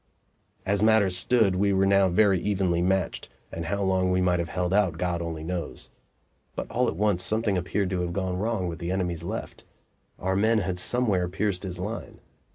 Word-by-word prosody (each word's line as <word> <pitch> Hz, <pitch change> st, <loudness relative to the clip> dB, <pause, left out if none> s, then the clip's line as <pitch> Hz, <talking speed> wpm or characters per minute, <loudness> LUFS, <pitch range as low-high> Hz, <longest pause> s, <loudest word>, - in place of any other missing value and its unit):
As 100 Hz, +1 st, +1 dB
matters 110 Hz, -4 st, +4 dB
stood, 100 Hz, +1 st, +3 dB
we 100 Hz, +1 st, +2 dB
were 95 Hz, 0 st, +3 dB
now 100 Hz, -1 st, +4 dB
very 95 Hz, 0 st, +3 dB
evenly 95 Hz, -3 st, 0 dB
matched, 95 Hz, +1 st, -1 dB, 0.2 s
and 85 Hz, 0 st, -5 dB
how 100 Hz, +2 st, -1 dB
long 95 Hz, -1 st, +1 dB
we 90 Hz, 0 st, +2 dB
might 90 Hz, -1 st, +2 dB
have 85 Hz, 0 st, -2 dB
held 90 Hz, 0 st, -1 dB
out 100 Hz, -4 st, +2 dB
God 90 Hz, -1 st, -1 dB
only 80 Hz, -2 st, -5 dB
knows. 85 Hz, +1 st, -5 dB, 0.6 s
But -, -, -5 dB
all 125 Hz, +1 st, +1 dB
at -, -, -2 dB
once 105 Hz, -4 st, +1 dB
something 110 Hz, -1 st, 0 dB
appeared 90 Hz, +1 st, -1 dB
to 90 Hz, -1 st, -1 dB
have 90 Hz, -1 st, -2 dB
gone 95 Hz, 0 st, -2 dB
wrong 105 Hz, -3 st, -1 dB
with 85 Hz, -1 st, -5 dB
the 85 Hz, +1 st, -3 dB
enemy's 90 Hz, -3 st, -2 dB
left; 105 Hz, +7 st, -6 dB, 0.5 s
our 95 Hz, +1 st, -1 dB
men 110 Hz, +3 st, +3 dB
had 95 Hz, -3 st, -1 dB
somewhere 100 Hz, -5 st, +1 dB
pierced 95 Hz, 0 st, -1 dB
his 90 Hz, -3 st, -5 dB
line. 105 Hz, +5 st, -6 dB
95 Hz, 195 wpm, -26 LUFS, 90-100 Hz, 0.6 s, matters